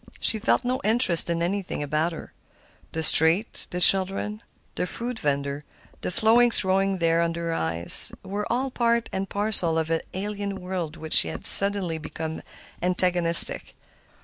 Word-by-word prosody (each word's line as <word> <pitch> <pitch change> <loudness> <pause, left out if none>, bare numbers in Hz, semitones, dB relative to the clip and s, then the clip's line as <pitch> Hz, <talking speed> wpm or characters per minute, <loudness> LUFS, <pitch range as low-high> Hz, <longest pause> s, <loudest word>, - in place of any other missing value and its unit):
She 220 - +1
felt 235 +3 -2
no 255 +2 -4
interest 215 -7 +1
in 170 0 -3
anything 185 -3 -5
about 155 +4 -3
her. 165 - -12 0.6
The 160 - -5
street, 160 +7 +2
the 180 - -7
children, 195 +3 +1 0.3
the 180 - -5
fruit 235 +2 -6
vender, 140 0 -5 0.4
the - - -6
flowers 230 +5 +3
growing 195 0 -2
there 165 -1 -1
under 170 0 -5
her - - -4
eyes, 85 - +2
were 205 +2 -7
all 260 +2 -4
part 235 -1 -2
and 190 0 -6
parcel 200 -6 -2
of 160 0 -4
an 165 - -2
alien 200 0 -7
world 180 -3 -8
which 160 -1 +4
had 80 -1 -7
suddenly 195 -5 +7
become 160 +1 -9 0.4
antagonistic. 180 -1 +1
180 Hz, 150 wpm, -22 LUFS, 165-205 Hz, 0.6 s, suddenly